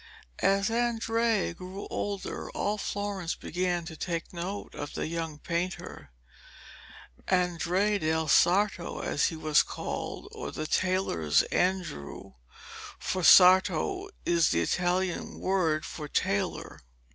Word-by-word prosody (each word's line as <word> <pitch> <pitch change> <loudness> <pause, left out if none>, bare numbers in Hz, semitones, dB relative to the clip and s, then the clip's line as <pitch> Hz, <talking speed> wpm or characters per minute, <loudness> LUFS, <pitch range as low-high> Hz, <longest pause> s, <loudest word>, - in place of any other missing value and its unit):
As 195 +3 +2
Andrea 230 -3 +1
grew 185 +3 -8
older, 200 -1 -4
all 205 +1 -1
Florence 200 -4 -3
began 175 0 -2
to 165 -2 -8
take 170 +2 -4
note 180 +4 -5
of 145 - -6
the - - -2
young 165 -1 -4
painter 170 - -4 1.2
'Andrea 180 +3 +1
del 160 -1 0
Sarto,' 180 +4 +2
as 145 - 0
he 165 - -1
was 155 -1 +3
called, - - -5
or - - -6
'the 155 - -4
tailor's 155 - +1
Andrew,' 180 - -2 0.6
for 185 - -2
sarto 190 - +6 0.2
is 170 -1 +3
the 85 - +1
Italian 180 - -1
word 170 -5 +1
for 150 -2 -6
tailor. 100 -7 -2
180 Hz, 115 wpm, -28 LUFS, 160-195 Hz, 1.2 s, sarto